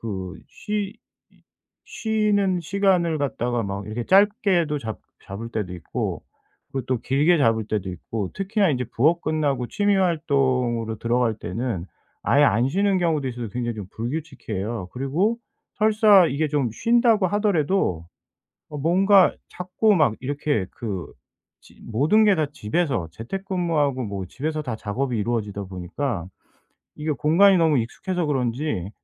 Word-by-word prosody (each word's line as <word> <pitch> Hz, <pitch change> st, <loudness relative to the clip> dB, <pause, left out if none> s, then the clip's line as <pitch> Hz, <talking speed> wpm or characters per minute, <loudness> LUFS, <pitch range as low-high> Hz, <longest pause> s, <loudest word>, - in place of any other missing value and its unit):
그 95 Hz, -4 st, -5 dB
쉬 210 Hz, -1 st, -4 dB, 0.4 s
이 -, -, -28 dB, 0.5 s
쉬는 210 Hz, -4 st, +1 dB
시간을 175 Hz, -2 st, +1 dB
갖다가 120 Hz, -4 st, -1 dB
막 100 Hz, 0 st, -4 dB
이렇게 110 Hz, +3 st, -4 dB
짧게도 190 Hz, -, +3 dB
잡 110 Hz, -4 st, -6 dB, 0.2 s
잡을 110 Hz, +4 st, -7 dB
때도 105 Hz, -6 st, -3 dB
있고 85 Hz, -5 st, -4 dB, 0.5 s
그리고 135 Hz, -2 st, -3 dB
또 130 Hz, -2 st, 0 dB
길게 145 Hz, +8 st, +2 dB
잡을 115 Hz, -5 st, +2 dB
때도 105 Hz, -4 st, -2 dB
있고 95 Hz, +3 st, -5 dB
특히나 195 Hz, -1 st, +1 dB
인제 125 Hz, -2 st, -1 dB
부업 160 Hz, +8 st, +3 dB
끝나고 145 Hz, -5 st, 0 dB
취미 205 Hz, -1 st, +1 dB
활동으로 130 Hz, -, 0 dB
들어갈 120 Hz, -1 st, +1 dB
때는 95 Hz, -1 st, -4 dB, 0.4 s
아예 145 Hz, +1 st, +4 dB
안 120 Hz, 0 st, +3 dB
쉬는 195 Hz, +4 st, +1 dB
경우도 160 Hz, -5 st, 0 dB
있어서 120 Hz, -3 st, -5 dB
굉장히 120 Hz, +2 st, -3 dB
좀 105 Hz, -3 st, -6 dB
불규칙해요. 115 Hz, -, -4 dB
그리고 160 Hz, -, 0 dB, 0.4 s
설사 210 Hz, -3 st, +5 dB
이게 155 Hz, +2 st, 0 dB
좀 140 Hz, -5 st, 0 dB
쉰다고 230 Hz, -, +3 dB
하더라도 185 Hz, -, 0 dB, 0.6 s
어 150 Hz, -, -6 dB
뭔가 185 Hz, +5 st, +4 dB
자꾸 185 Hz, +4 st, +1 dB
막 145 Hz, -9 st, +3 dB
이렇게 140 Hz, -6 st, -1 dB
그 100 Hz, -6 st, -5 dB, 0.5 s
지 -, -, -19 dB
모든 150 Hz, -, +3 dB
게 205 Hz, -2 st, +5 dB
다 155 Hz, -2 st, +1 dB
집에서 130 Hz, -, -1 dB
재택근무하고 165 Hz, -, -1 dB
뭐 100 Hz, -3 st, -5 dB
집에서 155 Hz, -, -3 dB
다 125 Hz, -5 st, -4 dB
작업이 120 Hz, +4 st, -2 dB
이루어지다 105 Hz, -2 st, -2 dB
보니까 95 Hz, -, -4 dB, 0.7 s
이게 155 Hz, +1 st, -3 dB
공간이 180 Hz, +7 st, +4 dB
너무 160 Hz, -4 st, +3 dB
익숙해서 175 Hz, +9 st, -2 dB
그런지 125 Hz, -, -1 dB
140 Hz, 305 characters per minute, -23 LUFS, 115-180 Hz, 0.7 s, 설사